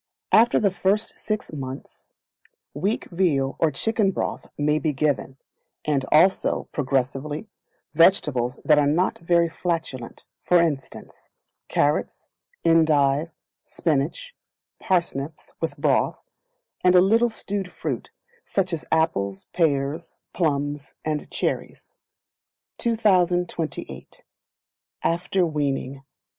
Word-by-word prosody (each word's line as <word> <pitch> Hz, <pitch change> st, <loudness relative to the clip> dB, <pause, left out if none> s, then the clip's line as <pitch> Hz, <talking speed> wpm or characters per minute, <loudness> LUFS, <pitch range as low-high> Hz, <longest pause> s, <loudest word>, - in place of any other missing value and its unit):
After 235 Hz, +2 st, +5 dB
the 200 Hz, -2 st, +2 dB
first 195 Hz, +4 st, 0 dB
Six 215 Hz, -5 st, -4 dB
Months, 135 Hz, -2 st, -8 dB, 0.7 s
weak 195 Hz, +10 st, -1 dB
veal 145 Hz, -7 st, +1 dB
or 165 Hz, -, +3 dB
chicken 210 Hz, +7 st, +1 dB
broth 190 Hz, -, -3 dB
may 150 Hz, +1 st, +2 dB
be 155 Hz, -2 st, 0 dB
given, 135 Hz, -1 st, -1 dB, 0.5 s
and 140 Hz, -3 st, +1 dB
also, 180 Hz, +5 st, +3 dB
progressively, 140 Hz, -, -2 dB, 0.5 s
vegetables 145 Hz, -7 st, +3 dB
that 150 Hz, -2 st, +5 dB
are 145 Hz, -, +3 dB
not 170 Hz, +6 st, +1 dB
very 170 Hz, 0 st, +3 dB
flatulent, 160 Hz, -7 st, -4 dB, 0.2 s
for 180 Hz, -, +4 dB
instance, 155 Hz, -5 st, -3 dB, 0.4 s
carrots, -, -, 0 dB, 0.4 s
endive, 155 Hz, -2 st, +3 dB, 0.3 s
spinach, 165 Hz, -, -2 dB, 0.5 s
parsnips, 160 Hz, -5 st, -2 dB
with -, -, -2 dB
broth, -, -, +1 dB, 0.6 s
and 180 Hz, 0 st, +5 dB
a -, -, +9 dB
little 225 Hz, +6 st, +4 dB
stewed 200 Hz, -4 st, -3 dB
fruit, -, -, -4 dB, 0.3 s
such 185 Hz, -2 st, -1 dB
as 160 Hz, -, -3 dB
apples, 100 Hz, -12 st, 0 dB
pears, 155 Hz, -1 st, 0 dB, 0.2 s
plums, 145 Hz, -3 st, -1 dB
and 155 Hz, -1 st, -2 dB
cherries. -, -, -4 dB, 0.9 s
2028. 180 Hz, -, 0 dB, 0.8 s
After 180 Hz, +2 st, +1 dB
Weaning. 140 Hz, -3 st, -2 dB
160 Hz, 100 wpm, -24 LUFS, 140-180 Hz, 0.9 s, a